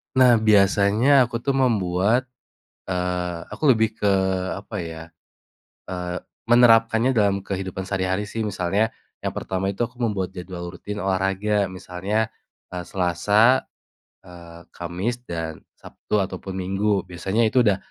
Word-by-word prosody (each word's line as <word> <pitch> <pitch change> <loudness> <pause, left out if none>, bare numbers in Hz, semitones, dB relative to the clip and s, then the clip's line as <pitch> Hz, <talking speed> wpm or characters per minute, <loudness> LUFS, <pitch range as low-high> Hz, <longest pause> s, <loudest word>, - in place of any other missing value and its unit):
Nah, 125 -3 +6
biasanya 110 +5 +4
aku 120 -1 -5
tuh 135 +2 0
membuat 110 0 +1 0.6
eee, 90 -1 -2 0.2
aku 150 -3 +3
lebih 110 -2 +2
ke 105 -2 +1 0.5
apa 105 +2 -8
ya, 80 -1 -7 0.9
eee, 90 -1 -4 0.3
menerapkannya 115 +1 +5
dalam 100 -3 +1
kehidupan 95 -1 -4
sehari-hari 95 +1 -1
sih. 110 +2 -4
Misalnya 100 +1 0 0.3
yang - - -1
pertama 95 +1 -2
itu 115 +4 -1
aku 125 +1 -10
membuat 95 -5 -1
jadwal 90 -1 -7
rutin 105 +3 -6
olahraga. 95 +1 0
Misalnya, 95 +4 -2 0.5
eee, 90 - -3
Selasa, 100 +7 +3 0.6
eee, 85 -1 -13
Kamis, 90 +8 -3
dan 80 -2 -4 0.2
Sabtu - - -4
ataupun 95 -1 -3
Minggu. 95 +2 0
Biasanya 95 +5 -1
itu 125 +3 +3
udah 105 -5 +4
100 Hz, 125 wpm, -23 LUFS, 90-110 Hz, 0.9 s, Nah